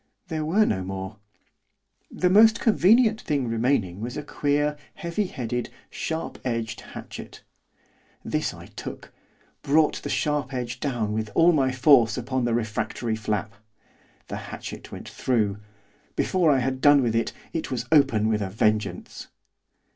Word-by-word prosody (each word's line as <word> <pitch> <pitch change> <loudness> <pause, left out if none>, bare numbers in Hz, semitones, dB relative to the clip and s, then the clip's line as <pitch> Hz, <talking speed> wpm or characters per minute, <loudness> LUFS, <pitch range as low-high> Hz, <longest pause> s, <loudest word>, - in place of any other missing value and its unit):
There 160 -2 -2
were 195 +8 +3
no 95 -3 -1
more. 95 +2 -6 0.9
The 180 0 +1
most 220 +3 +6
convenient 220 +1 +4
thing 140 -5 -1
remaining 115 -5 0
was 120 +2 -4
a 150 - -4
queer, 145 +1 0 0.2
heavy 190 +2 -2
headed, 120 -5 -3 0.2
sharp 160 0 -4
edged 115 -3 -3
hatchet. - - -10 0.8
This - - -1
I - - -11
took, - - -9 0.5
brought 150 +2 +3
the 145 - -5
sharp 145 -3 -1
edge 125 0 -4
down 120 -7 -1
with 110 0 -2
all 165 +1 +6
my 135 -5 +2
force 125 -3 +5
upon 130 0 -1
the 120 -1 +1
refractory 110 0 -2
flap. 105 -1 -2 0.7
The - - -5
hatchet - - -8
went - - -8
through, 105 -5 0 0.6
before 180 -4 +2
I 140 - +5
had 130 +1 -2
done 145 -2 +6
with 115 -2 0
it, 115 - +1 0.2
it 165 - -3
was 130 - -3
open 135 -8 +4
with 110 -1 +1
a 100 - -2
vengeance. 105 -2 -1
125 Hz, 145 wpm, -25 LUFS, 110-150 Hz, 0.9 s, most